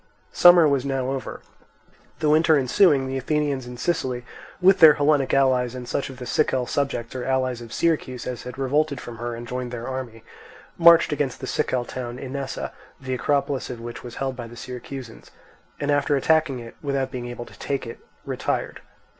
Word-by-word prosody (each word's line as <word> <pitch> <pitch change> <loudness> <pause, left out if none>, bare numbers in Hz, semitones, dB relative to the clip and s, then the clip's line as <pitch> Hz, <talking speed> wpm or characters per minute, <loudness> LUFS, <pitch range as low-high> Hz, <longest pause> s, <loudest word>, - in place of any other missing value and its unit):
Summer 175 -2 +7
was 140 -3 +1
now 135 -1 -1
over. 135 -1 -5 0.8
The 150 - +2
winter 160 0 +5
ensuing, 140 +1 +4
the 130 0 -3
Athenians 140 -2 -1
in 125 0 -8
Sicily 130 -5 -2 0.3
with 190 +1 +5
their 155 -3 +9
Hellenic 145 -2 +2
allies, 130 -2 +2
and 125 -1 -7
such 140 - -2
of 130 - -10
the 125 - -7
Sicel 130 -2 +1
subjects 135 -5 -2
or 130 -1 -4
allies 130 -2 0
of 115 -1 -10
Syracuse 145 -7 -1
as 125 -1 -4
had 125 +1 -8
revolted 140 +1 0
from 120 -2 -9
her 120 0 -4
and 120 +1 -8
joined 125 +1 -4
their 120 -1 -5
army, 130 -4 -6 0.5
marched 170 -2 +6
against 145 -3 -2
the - - -5
Sicel 125 -1 -1
town 120 -1 -6
Inessa, 135 +1 -5 0.3
the 130 -1 -4
acropolis 140 +1 0
of 125 -2 -6
which 120 0 -7
was 120 -1 -9
held 135 -1 -3
by 120 -2 -7
the 120 +1 -12
Syracusans, 125 -1 -8 0.5
and 145 0 0
after 145 0 +2
attacking 155 -1 +2
it 115 -1 -10
without 140 -2 -1
being 125 -2 -5
able 120 0 -7
to - - -16
take 140 -2 -2
it, 115 - -8 0.3
retired. - - -3
130 Hz, 190 wpm, -24 LUFS, 125-145 Hz, 0.8 s, their